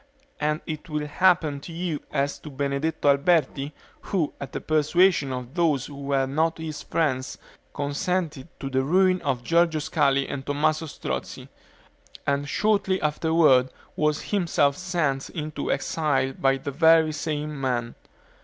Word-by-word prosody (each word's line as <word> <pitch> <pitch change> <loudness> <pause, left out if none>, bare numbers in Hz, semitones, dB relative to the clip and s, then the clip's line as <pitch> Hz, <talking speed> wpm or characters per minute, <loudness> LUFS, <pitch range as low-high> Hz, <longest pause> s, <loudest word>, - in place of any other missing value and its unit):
And 150 +1 0
it 155 +2 -6
will 150 -1 -2
happen 160 -2 +2
to 155 - -10
you 165 -2 -3
as 140 -1 -1
to 150 - -9
Benedetto 140 +3 -2
Alberti, 140 -1 +2 0.3
who, 170 -7 -1
at 140 -1 -6
the - - -4
persuasion 155 0 +2
of 125 0 -5
those 160 -6 +1
who 145 - -10
were 140 -1 +1
not 160 +5 0
his 160 -2 -6
friends, 135 -5 -1 0.3
consented 155 0 -2
to 135 - -5
the 130 0 +2
ruin 185 +5 +3
of 135 -5 -1
Giorgio 165 +1 +2
Scali 140 -2 +1
and 135 - -5
Tommaso 150 +3 0
Strozzi, - - -5 0.8
and 140 +1 0
shortly 200 -2 +1
afterward 150 -4 +3 0.3
was 150 0 0
himself 170 -8 +2
sent 170 -7 -1
into 155 -2 -4
exile 140 -4 0
by 135 0 +2
the 140 +1 -5
very 160 +1 +5
same 150 -1 -3
men." 120 -3 -1
150 Hz, 145 wpm, -25 LUFS, 140-165 Hz, 0.8 s, very